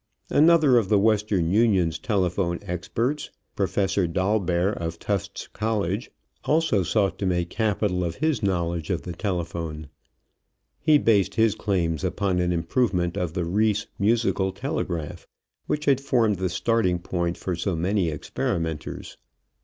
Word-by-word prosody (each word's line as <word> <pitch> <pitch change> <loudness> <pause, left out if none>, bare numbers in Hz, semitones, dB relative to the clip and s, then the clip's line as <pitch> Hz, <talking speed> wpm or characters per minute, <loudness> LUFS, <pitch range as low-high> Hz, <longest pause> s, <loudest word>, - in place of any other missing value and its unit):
Another 155 -5 +5
of 100 -4 -3
the 105 - +4
Western 105 -5 +2
Union's 95 -7 +2
telephone 90 -2 0
experts, 115 - -2 0.3
Professor 95 -2 +1
Dolbear, 95 0 +1
of 85 -2 -4
Tufts 100 +2 -3
College, 105 -1 -2 0.3
also 155 -10 +2
sought 95 0 0
to 95 - -1
make 90 -1 -1
capital 105 -4 0
of 85 -1 -3
his 155 -6 0
knowledge 85 -5 -1
of 90 -3 -1
the 90 - -5
telephone. 85 -5 -4 0.9
He 155 -2 +5
based 105 - +2
his 110 -2 +3
claims 90 -8 -1
upon 95 -3 0
an 90 0 +1
improvement 90 0 0
of 85 -3 -2
the 90 -2 -1
Reis 105 +4 +1
musical 105 -2 +1
telegraph, 85 -2 -4 0.4
which 150 0 -1
had 135 -2 +3
formed 115 -7 +2
the 95 0 -1
starting 95 -1 +1
point 85 0 -2
for 90 - -3
so 85 +2 -2
many 90 +2 0
experimenters. 80 0 -4
95 Hz, 140 wpm, -25 LUFS, 85-110 Hz, 0.9 s, Another